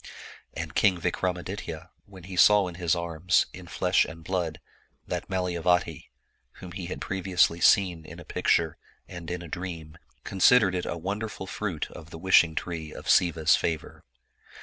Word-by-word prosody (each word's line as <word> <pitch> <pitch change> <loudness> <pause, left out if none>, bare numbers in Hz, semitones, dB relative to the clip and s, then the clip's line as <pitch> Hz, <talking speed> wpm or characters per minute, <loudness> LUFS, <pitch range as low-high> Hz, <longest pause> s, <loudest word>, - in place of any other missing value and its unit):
And - - -5
King 95 -4 +3
Vikramaditya, 90 -1 -3 0.2
when 95 -3 -13
he 95 +1 -8
saw 105 +1 +6
in 90 - -6
his 85 0 +2
arms, 85 +1 +1
in 90 -1 -10
flesh 90 +1 +2
and 80 0 -9
blood, 85 -3 -2 0.5
that - - -4
Malayavati, 90 -1 0 0.4
whom 90 - -11
he 90 -1 -6
had 90 - -5
previously 90 -3 +1
seen 90 -5 +4
in - - -11
a - - -11
picture 80 -2 +1 0.3
and 85 -2 -8
in 90 0 -4
a - - -8
dream, 85 -2 -7 0.2
considered 100 +1 +4
it 90 -1 -2
a 85 - -3
wonderful 100 +3 -4
fruit 95 -4 -4
of 80 -1 -11
the 80 - -9
wishing 85 -2 +4
tree 80 -3 -4
of - - -10
Siva's 85 -2 +4
favor. 80 -3 -3
90 Hz, 160 wpm, -27 LUFS, 85-95 Hz, 0.5 s, saw